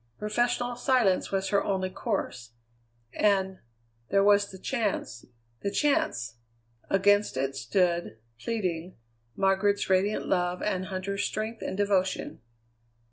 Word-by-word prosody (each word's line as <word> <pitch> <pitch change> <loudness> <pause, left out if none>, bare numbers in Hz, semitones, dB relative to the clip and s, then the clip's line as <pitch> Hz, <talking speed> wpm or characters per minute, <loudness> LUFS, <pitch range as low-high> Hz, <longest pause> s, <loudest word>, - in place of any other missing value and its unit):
Professional 240 - 0
silence 240 -7 +2
was 195 0 0
her 200 -1 +2
only 190 -1 -1
course. 130 - -3 0.6
And 190 -2 +1 0.5
there 195 0 +4
was 205 0 +4
the 190 - -10
chance 205 - -2 0.4
the 200 - -1
chance! 120 - 0 0.5
Against 205 -4 +3
it 135 +1 -1
stood, 175 - 0 0.2
pleading, 185 - -3 0.4
Margaret's 195 +1 +2
radiant 195 +3 +2
love 180 -1 +1
and 185 -3 -1
Huntter's 195 +1 -3
strength 220 +2 -3
and 190 - -4
devotion. 195 - 0
195 Hz, 115 wpm, -28 LUFS, 185-210 Hz, 0.6 s, there